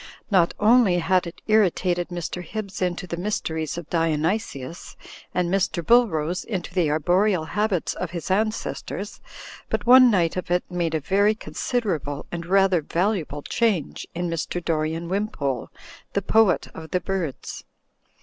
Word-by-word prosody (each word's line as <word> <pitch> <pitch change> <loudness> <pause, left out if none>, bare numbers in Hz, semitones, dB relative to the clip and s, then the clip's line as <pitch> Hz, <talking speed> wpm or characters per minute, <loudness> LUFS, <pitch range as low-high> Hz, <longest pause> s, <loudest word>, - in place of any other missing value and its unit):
Not 175 -4 +3
only 215 -4 +5
had 180 +1 +2
it 170 - -11
initiated 180 -4 +2
Mr. 175 0 -4
Hibbs 200 +2 -6
into 180 -1 -1
the 170 -1 -5
mysteries 160 -5 -2
of 170 -3 -6
Dionysius, 165 -2 -1 0.4
and 180 -1 0
Mr. 190 -3 0
BuUrose 180 -9 +3
into 190 -6 -4
the 175 -5 +2
arboreal 175 +4 +2
habits 205 0 0
of 180 - -4
his 170 +2 -5
an 215 +3 +3
cestors, 215 - -6 0.5
but - - -1
one 255 +1 +8
night 180 -5 +2
of 185 - -4
it 180 0 +2
made 170 -2 -1
a - - +1
very 200 +7 +2
considerable 180 - -3
and 170 -1 -5
rather 190 -2 +4
valuable 165 -3 -1
change 210 - -1
in 175 +1 -1
Mr. 170 +1 -2
Dorian 160 +1 -1
Wimpole, 170 - -2 0.4
the 200 - 0
Poet 215 -3 +3
of 160 0 -9
the 180 - +1
Birds. 180 -6 -4
180 Hz, 150 wpm, -24 LUFS, 165-200 Hz, 0.5 s, one